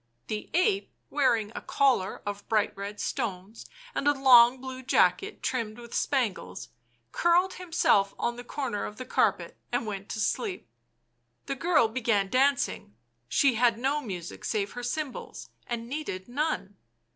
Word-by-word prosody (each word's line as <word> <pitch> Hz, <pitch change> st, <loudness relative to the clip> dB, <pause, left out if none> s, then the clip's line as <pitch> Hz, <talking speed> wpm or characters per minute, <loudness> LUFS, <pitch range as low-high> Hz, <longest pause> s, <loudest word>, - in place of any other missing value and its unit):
The 215 Hz, -1 st, -4 dB
ape, 390 Hz, +2 st, +2 dB, 0.2 s
wearing 235 Hz, -7 st, +2 dB
a -, -, -6 dB
collar 260 Hz, -9 st, +1 dB
of 205 Hz, 0 st, -6 dB
bright 215 Hz, -2 st, +1 dB
red 200 Hz, +1 st, -6 dB
stones 215 Hz, -4 st, -4 dB, 0.3 s
and 285 Hz, -, -1 dB
a 290 Hz, -1 st, +3 dB
long 250 Hz, -1 st, +7 dB
blue 260 Hz, 0 st, -7 dB
jacket 395 Hz, -, +2 dB
trimmed 230 Hz, -4 st, -2 dB
with 235 Hz, -1 st, -11 dB
spangles, 215 Hz, -, -1 dB, 0.4 s
curled 350 Hz, +2 st, +3 dB
himself 325 Hz, -, +2 dB
on 235 Hz, -, -1 dB
the 245 Hz, -, -8 dB
corner 245 Hz, -5 st, -3 dB
of 210 Hz, -, -8 dB
the 255 Hz, -, -6 dB
carpet -, -, 0 dB
and 240 Hz, -1 st, 0 dB
went 200 Hz, -2 st, -5 dB
to -, -, -4 dB
sleep. 375 Hz, -, -2 dB, 0.8 s
The -, -, -2 dB
girl 300 Hz, -3 st, +3 dB
began 220 Hz, -4 st, 0 dB
dancing; 275 Hz, -, +1 dB, 0.3 s
she 270 Hz, -, +4 dB
had 235 Hz, 0 st, +3 dB
no 275 Hz, +5 st, 0 dB
music 180 Hz, -, -7 dB
save 205 Hz, -2 st, -1 dB
her 245 Hz, -, -6 dB
cymbals, 270 Hz, +2 st, -5 dB, 0.2 s
and 235 Hz, -1 st, -4 dB
needed 255 Hz, -9 st, -5 dB
none. 245 Hz, -7 st, -2 dB
240 Hz, 150 wpm, -28 LUFS, 210-280 Hz, 0.8 s, long